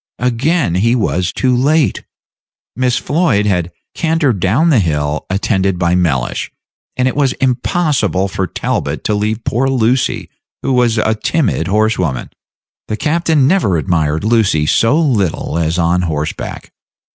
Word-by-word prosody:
Again 125 - 0
he 115 +7 +2
was 90 -6 0
too 130 -1 +1
late; 145 +4 +1 0.7
Miss 125 0 +1
Floyd 145 - +1
had 90 -4 0 0.2
cantered 160 - 0
down 125 - +2
the 130 - +4
hill 75 -4 -1
attended 95 -1 0
by 85 -1 +1
Mellish, 75 -9 -1 0.5
and 130 0 +2
it 130 - -1
was 140 -3 +1
impossible 130 - 0
for 95 -1 -3
Talbot - - -3
to 105 - 0
leave 105 +2 -1
poor 125 +4 0
Lucy, 125 -1 0 0.4
who 135 - 0
was 120 -2 +2
a 110 0 +2
timid 140 +7 -1
horsewoman. 95 - 0 0.6
The 110 - -3
captain 155 +1 +1
never 145 - +2
admired 80 -2 0
Lucy 105 -9 +2
so 115 - +3
little 100 - 0
as 80 +1 0
on 85 +1 +1
horseback. 75 -3 -4
110 Hz, 140 wpm, -15 LUFS, 90-130 Hz, 0.7 s, the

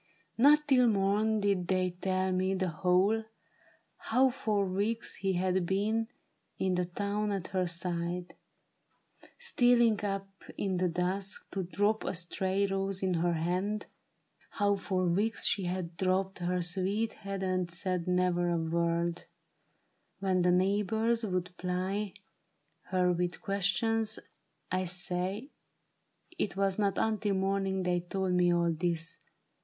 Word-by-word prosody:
Not 295 +4 +5
till 255 -3 +5
morn 210 +1 +2
Did 195 -3 +1
they 185 -1 +1
tell 185 +1 -1
me 185 +1 +1
the 185 -1 0
whole 185 +7 +2 0.4
— - - -34
how 260 +3 +4
for 210 -5 0
weeks 205 +5 -2
he 195 -1 0
had 185 0 +1
been 215 +4 +1 0.5
In 190 -1 0
the 180 0 +1
town 205 +3 -2
at 195 -3 -3
her 185 -1 0
side; 175 0 -3 1.0
stealing 245 - +3
up 195 -1 -2 0.3
in 190 -2 -1
the 180 0 +2
dusk 185 +3 -2
To 195 - -2
drop 205 +4 0
a - - -2
stray 190 +3 0
rose 195 0 -2
in 185 -1 +1
her 175 +1 +1
hand 180 +6 -1 0.3
— - - -35
how 205 -1 +3
for 190 -2 -1
weeks 205 +6 0
She 195 - +1
had 175 -1 -3
drooped 190 0 0
her 180 0 0
sweet 195 +5 0
head 195 -2 -5
and 185 -1 0
said 180 0 -3
never 180 -1 +2
a 170 - +1
word 170 +1 0 0.9
When 190 -2 +1
the 180 0 +4
neighbors 210 +5 +1
would 180 -3 -2
ply 185 +3 -2 0.7
her 180 -1 +2
with 175 0 -1
questions. 215 +3 0 0.5
I 185 0 0
say 180 - -1 0.9
It 205 - -1
was 195 0 +1
not 200 -2 +1
until 215 -2 +1
morning 190 0 0
they 180 -1 +1
told 185 +1 -2
me 180 -1 +4
all 170 -1 +2
this. 165 0 -2
190 Hz, 140 wpm, -31 LUFS, 180-205 Hz, 1.0 s, Not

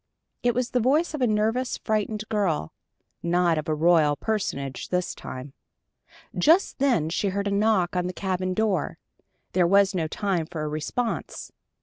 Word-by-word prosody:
It 240 -1 +1
was 250 0 -1
the 250 - +2
voice 295 +8 +2
of 300 - -4
a 250 - +4
nervous, 220 +4 0
frightened 215 0 -1
girl 195 - -1 0.5
not 170 -1 +2
of 155 - -5
a 155 - +1
royal 155 -2 +4
personage 140 - -3
this 180 -1 -1
time. 130 +2 -8 0.8
Just 330 +3 +3
then 250 - +2
she 200 - 0
heard 200 +1 -1
a - - -1
knock 200 -3 +2
on 180 0 0
the - - -2
cabin 185 -1 -2
door. 205 -7 0 0.5
There 180 -1 +3
was 200 +2 +4
no 165 -4 -1
time 180 -1 -1
for 160 -3 -5
a - - -2
response. 155 +10 -3
190 Hz, 165 wpm, -25 LUFS, 170-220 Hz, 0.8 s, a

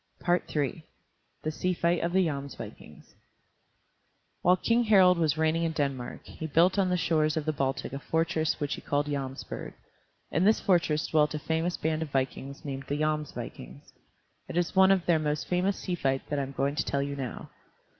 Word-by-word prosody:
III 160 -3 0 0.6
THE 155 - -1
SEA 180 +4 -1
FIGHT 170 0 +1
OF 170 - 0
THE 190 0 +3
JOMSVIKINGS 140 -3 -7 1.3
While 180 +1 +4
King 230 +5 +2
Harald 185 -5 +6
was 155 -2 +2
reigning 160 +1 +2
in 165 -1 0
Denmark, 140 -5 -3
he 160 - -6
built 175 +6 +3
on 190 -2 +2
the 180 - +2
shores 155 -2 +1
of 155 - -1
the 155 - 0
Baltic 135 -2 -2
a 140 - -3
fortress 160 0 0
which 145 -2 -1
he - - -6
called 145 0 0
Jomsburg. 135 -2 -5 0.6
In 170 - +2
this 215 +3 +4
fortress 165 -5 +2
dwelt 150 -1 +2
a - - 0
famous 160 +3 -1
band 160 0 -1
of 160 - -3
vikings 135 +1 -3
named 135 -1 -5
the 145 - -1
Jomsvikings. 155 -1 -4 0.6
It - - -4
is 175 +1 0
one 190 0 +7
of 190 -3 +2
their 170 -2 +3
most 150 -3 -1
famous 185 +2 +1
sea 185 - -4
fights 135 -5 0
that 145 - 0
I - - +1
am 135 0 -5
going 140 +1 0
to - - +2
tell 140 0 -1
you 140 0 -4
now. 130 -3 -6
155 Hz, 190 wpm, -28 LUFS, 140-175 Hz, 1.3 s, one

